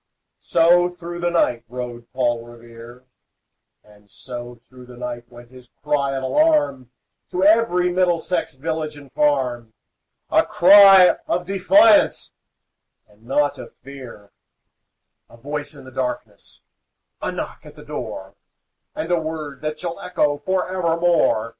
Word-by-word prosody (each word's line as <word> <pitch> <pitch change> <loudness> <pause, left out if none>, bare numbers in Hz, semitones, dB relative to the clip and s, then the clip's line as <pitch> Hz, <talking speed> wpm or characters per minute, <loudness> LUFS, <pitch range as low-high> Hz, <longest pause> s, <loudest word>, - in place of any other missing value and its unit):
So 175 +2 +3
through 175 -1 -9
the 175 0 0
night 120 -9 0
rode 120 -1 -8
Paul 120 -2 -1
Revere; 120 +1 -14 0.8
And 105 -1 -22
so 120 +2 -9
through 125 +1 -17
the 125 -1 -13
night 120 -1 -7
went 120 0 -15
his 125 -2 -16
cry 140 -2 0
of 135 - -4
alarm 290 - +1 0.4
To 180 - -2
every 195 -4 +3
Middlesex 175 -2 -1
village 155 +1 -4
and 140 -3 -15
farm, 125 -6 -1 0.6
A - - +4
cry 195 0 +7
of 175 0 -1
defiance 295 - +3 0.7
and 105 +2 -24
not 145 +1 0
of - - -11
fear, 125 -7 -13 1.0
A - - -17
voice 145 +3 -6
in 135 -2 -14
the 130 - -12
darkness, 125 -1 -6 0.6
a - - -2
knock - - -6
at - - -14
the - - -14
door, 95 0 -7 0.6
And 165 - -4
a 175 - +2
word 155 -4 -6
that 155 0 -4
shall 170 -1 -5
echo 145 -5 -1
forevermore! 175 -8 0
145 Hz, 135 wpm, -21 LUFS, 120-175 Hz, 1.0 s, cry